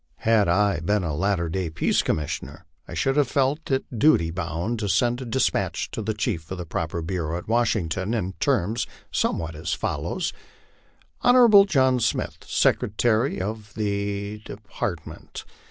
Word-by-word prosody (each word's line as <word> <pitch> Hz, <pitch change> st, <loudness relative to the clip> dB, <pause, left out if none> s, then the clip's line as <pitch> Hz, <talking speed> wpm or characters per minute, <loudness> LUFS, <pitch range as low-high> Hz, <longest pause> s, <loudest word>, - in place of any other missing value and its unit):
Had 110 Hz, -3 st, +4 dB
I 100 Hz, 0 st, +2 dB
been 105 Hz, +5 st, 0 dB
a 80 Hz, -3 st, -2 dB
latter 95 Hz, +1 st, 0 dB
day 90 Hz, +1 st, -2 dB
Peace 80 Hz, +1 st, +1 dB
Commissioner, 75 Hz, -1 st, -3 dB, 0.2 s
I -, -, -7 dB
should 135 Hz, 0 st, +1 dB
have 145 Hz, -3 st, +4 dB
felt 140 Hz, +5 st, 0 dB
in 135 Hz, -1 st, +1 dB
duty 110 Hz, -, +4 dB
bound 85 Hz, +6 st, -3 dB
to 105 Hz, -2 st, -2 dB
send 120 Hz, +4 st, +2 dB
a -, -, -5 dB
despatch 125 Hz, +3 st, 0 dB
to -, -, -4 dB
the 110 Hz, 0 st, -2 dB
chief 80 Hz, -6 st, -2 dB
of 95 Hz, -, -4 dB
the 90 Hz, -, -5 dB
proper 80 Hz, 0 st, -3 dB
bureau 85 Hz, -2 st, -2 dB
at 90 Hz, -, -8 dB
Washington, 105 Hz, -3 st, 0 dB
in 95 Hz, -4 st, -2 dB
terms 110 Hz, +7 st, +1 dB, 0.2 s
somewhat 80 Hz, -1 st, -1 dB
as 80 Hz, +1 st, -3 dB
follows: -, -, -2 dB, 0.9 s
JJon 235 Hz, -5 st, +7 dB
John 130 Hz, -7 st, +3 dB
Smith, 110 Hz, -2 st, -1 dB
Secretary 115 Hz, +4 st, +1 dB
of 105 Hz, +2 st, -5 dB
the 100 Hz, 0 st, -2 dB
Department. 100 Hz, -5 st, -6 dB
100 Hz, 155 wpm, -24 LUFS, 85-120 Hz, 0.9 s, JJon